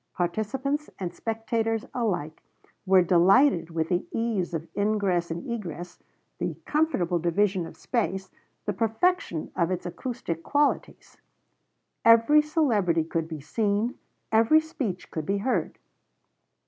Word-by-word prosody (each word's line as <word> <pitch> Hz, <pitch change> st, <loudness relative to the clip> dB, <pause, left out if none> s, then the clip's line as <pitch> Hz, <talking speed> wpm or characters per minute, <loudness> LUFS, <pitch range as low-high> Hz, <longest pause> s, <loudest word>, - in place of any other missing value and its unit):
Participants 260 Hz, -, -1 dB
and 175 Hz, -3 st, -4 dB
spectators 225 Hz, +1 st, -2 dB
alike 185 Hz, -, -2 dB, 0.5 s
were 185 Hz, -1 st, +6 dB
delighted 180 Hz, -, +4 dB
with 160 Hz, -1 st, -2 dB
the 175 Hz, 0 st, +1 dB
ease 225 Hz, -6 st, -1 dB
of 160 Hz, +1 st, -4 dB
ingress 200 Hz, -4 st, +1 dB
and 165 Hz, +1 st, -5 dB
egress, 175 Hz, -6 st, -6 dB, 0.4 s
the -, -, -2 dB
comfortable 195 Hz, -, +1 dB
division 180 Hz, +1 st, +1 dB
of -, -, -13 dB
space, 190 Hz, -6 st, -2 dB, 0.3 s
the 205 Hz, -, -1 dB
perfection 225 Hz, -, 0 dB
of 170 Hz, -1 st, +1 dB
its 185 Hz, -1 st, -3 dB
acoustic 175 Hz, -3 st, -4 dB
qualities. 290 Hz, -, -1 dB, 0.9 s
Every 230 Hz, +7 st, +6 dB
celebrity 225 Hz, -, +1 dB
could 165 Hz, 0 st, -2 dB
be 160 Hz, -3 st, -7 dB
seen, 210 Hz, -, -1 dB, 0.3 s
every 225 Hz, +8 st, +5 dB
speech 265 Hz, -, -5 dB
could 155 Hz, -2 st, -4 dB
be 200 Hz, -, +1 dB
heard. 235 Hz, +6 st, -1 dB
200 Hz, 120 wpm, -26 LUFS, 175-235 Hz, 0.9 s, were